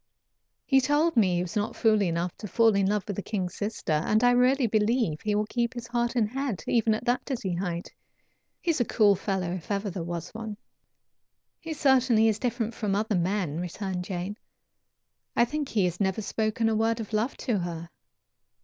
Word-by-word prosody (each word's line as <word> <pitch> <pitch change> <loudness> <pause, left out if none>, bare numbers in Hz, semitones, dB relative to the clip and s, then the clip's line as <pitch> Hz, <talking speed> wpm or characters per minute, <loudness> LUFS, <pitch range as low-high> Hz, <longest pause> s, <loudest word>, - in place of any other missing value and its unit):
He 270 -2 +4
told 295 +4 +2
me 190 -6 +4
he 175 - +1
was 180 +3 -7
not 210 0 -1
fool 215 -2 +3
enough 170 -1 -1
to 210 - -7
fall 225 +2 +4
in 195 -1 +2
love 205 0 +1
with 205 - -4
the - - -1
king's 185 -4 -3
sister, 205 -5 -3
and 210 +9 +2
I 245 - +6
really 250 +2 +4
believe 215 -6 +1
he 210 -1 0
will 210 +1 +1
keep 235 +2 -1
his 240 -1 -5
heart 240 +1 -1
and 225 -4 +2
head, 245 - -3
even 225 -2 +2
at 220 - -6
that 245 0 +1
dizzy 225 -9 -3
height. 175 -1 -4 0.7
He 345 - +2
is 305 - 0
a - - +2
cool 210 -3 +4
fellow, 190 -2 -2
if 180 -2 -5
there 205 - 0
ever 195 -3 -3
was 170 -1 -4
one." 220 -2 -6 1.0
"He 325 -1 -5
certainly 255 -6 +4
is 220 -1 +1
different 235 -2 -1
from 210 -3 -1
other 215 +1 0
men," 175 -3 0
returned 180 +1 -4
Jane. 185 +2 -4 1.0
"I 235 - +5
think 295 +2 -3
he 205 -4 +2
has 180 0 -2
never 195 +1 0
spoken 220 +2 0
a 220 - +2
word 225 +1 +1
of 220 -1 -6
love 220 +5 0
to 230 -6 -1
her. 170 -1 -5
215 Hz, 205 wpm, -27 LUFS, 185-235 Hz, 1.0 s, I